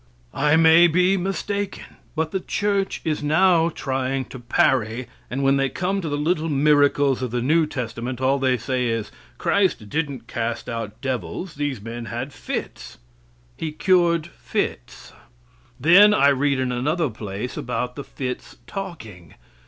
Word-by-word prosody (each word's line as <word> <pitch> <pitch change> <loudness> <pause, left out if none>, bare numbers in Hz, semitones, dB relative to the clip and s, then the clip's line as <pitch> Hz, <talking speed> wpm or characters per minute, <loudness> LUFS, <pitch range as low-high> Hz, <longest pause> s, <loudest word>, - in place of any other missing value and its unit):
I 150 +1 +3
may 165 +1 +7
be 180 +3 +3
mistaken; 195 +1 -3 0.3
but 160 0 -1
the 190 - -1
church 200 +1 -1
is 155 -2 -1
now 165 +2 +4
trying 135 -3 -2
to 130 - -7
parry, 120 0 +1 0.2
and 135 +3 -2
when 135 0 +4
they 135 0 +1
come 190 +7 -1
to 165 - -4
the 145 - -1
little 160 +2 0
miracles 145 -2 +3
of 130 - -2
the 120 +2 -2
new 155 +6 +2
testament 125 -2 -4
all 135 +1 +2
they 130 -1 +2
say 125 +1 -1
is: 115 -2 -2 0.3
"Christ 185 - +1
didn't 140 -4 -3
cast 115 0 -3
out 115 -1 -5
devils; 130 - -4
these 145 -4 -3
men 115 +1 -6
had - - -5
fits." - - -6 0.6
He 160 - -4
cured 170 0 +2
fits. - - -5 0.7
Then 195 +9 +7
I 140 - +5
read 140 0 +1
in 130 -1 0
another 145 +4 0
place 105 +2 -6
about 125 0 -3
the 140 - -6
fits 130 -2 -6
talking. 110 - -8
140 Hz, 150 wpm, -23 LUFS, 125-165 Hz, 0.7 s, may